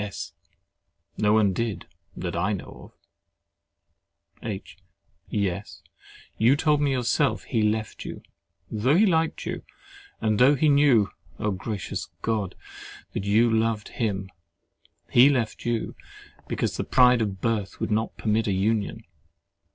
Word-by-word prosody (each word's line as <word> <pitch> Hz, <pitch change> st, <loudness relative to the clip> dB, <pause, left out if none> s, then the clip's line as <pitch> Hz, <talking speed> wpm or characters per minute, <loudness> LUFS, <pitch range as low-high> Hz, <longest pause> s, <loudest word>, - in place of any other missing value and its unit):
S. 105 Hz, -1 st, -6 dB, 0.8 s
No 105 Hz, -, +2 dB
one 105 Hz, -3 st, +4 dB
did, 105 Hz, -3 st, -3 dB, 0.3 s
that 85 Hz, -1 st, -4 dB
I 95 Hz, +5 st, +1 dB
know 95 Hz, -, -8 dB
of. -, -, -34 dB
H. 100 Hz, -3 st, -7 dB, 0.5 s
Yes, 100 Hz, -1 st, -3 dB, 0.6 s
you 120 Hz, +5 st, +5 dB
told 150 Hz, 0 st, +2 dB
me 145 Hz, -, +2 dB
yourself 130 Hz, +3 st, +1 dB
he 115 Hz, -, -1 dB
left 110 Hz, +1 st, -1 dB
you -, -, -8 dB, 0.5 s
(though 115 Hz, +7 st, +2 dB
he 205 Hz, +5 st, +5 dB
liked 165 Hz, -4 st, +1 dB
you, -, -, -4 dB, 0.6 s
and 110 Hz, -1 st, +1 dB
though 135 Hz, +4 st, +6 dB
he 150 Hz, +3 st, +3 dB
knew—Oh! 125 Hz, -7 st, +2 dB
gracious 100 Hz, +1 st, -4 dB
God! 105 Hz, -5 st, -1 dB, 0.6 s
that 100 Hz, -, -3 dB
you 110 Hz, +4 st, +4 dB
loved 110 Hz, -1 st, 0 dB
him) 95 Hz, -5 st, -2 dB, 0.8 s
he 125 Hz, +4 st, +7 dB
left 120 Hz, -5 st, -1 dB
you 115 Hz, -2 st, -1 dB, 0.5 s
because -, -, -2 dB
"the -, -, -1 dB
pride 125 Hz, -1 st, +5 dB
of 100 Hz, -3 st, -2 dB
birth 110 Hz, -3 st, -2 dB
would -, -, -2 dB
not 110 Hz, +2 st, -1 dB
permit 110 Hz, +1 st, 0 dB
a 100 Hz, -, +1 dB
union." 105 Hz, +2 st, 0 dB
110 Hz, 135 wpm, -25 LUFS, 100-125 Hz, 0.8 s, he